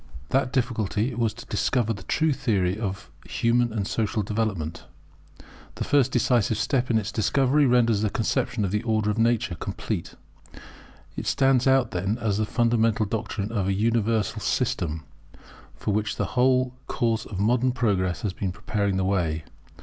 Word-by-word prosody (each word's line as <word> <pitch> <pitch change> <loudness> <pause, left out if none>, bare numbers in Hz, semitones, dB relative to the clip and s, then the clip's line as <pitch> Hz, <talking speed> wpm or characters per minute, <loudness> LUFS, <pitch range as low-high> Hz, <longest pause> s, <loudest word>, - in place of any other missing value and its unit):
That 130 -1 +1
difficulty 120 -2 0
was 115 -2 0
to - - -10
discover 115 -3 0
the 100 - -9
true 155 +9 +1
Theory 95 -8 0
of 100 -3 -5 0.2
human 120 0 +1
and 105 -3 -2
social 110 -1 -1
Development. 100 -7 -2 0.9
The - - -3
first 135 -3 +3
decisive 120 -3 +2
step 130 +3 0
in 115 - +2
this 110 0 0
discovery 135 +6 +2
renders 115 -4 +3
the 110 - +1
conception 110 +1 -1
of 95 - -2
the 105 - 0
Order 110 -3 +1
of 105 - -3
Nature 115 -3 +2
complete. 85 - -4 1.0
It - - -5
stands 135 -1 +3
out 130 -3 +3
then 95 +5 -1
as 110 -4 -1
the 110 - 0
fundamental 115 -1 +2
doctrine 105 0 -3
of 100 -5 -1
an 95 - +1
universal 110 -1 +1
system, 80 -1 -1 0.7
for 105 - -2
which 105 0 -1
the - - -1
whole 125 0 +3
course 115 -2 -1
of 95 - -6
modern 120 +5 +2
progress 100 -8 0
has 100 -4 -1
been 95 -1 -3
preparing 100 0 -1
the 95 - 0
way. 85 -5 0
110 Hz, 165 wpm, -25 LUFS, 100-120 Hz, 1.0 s, first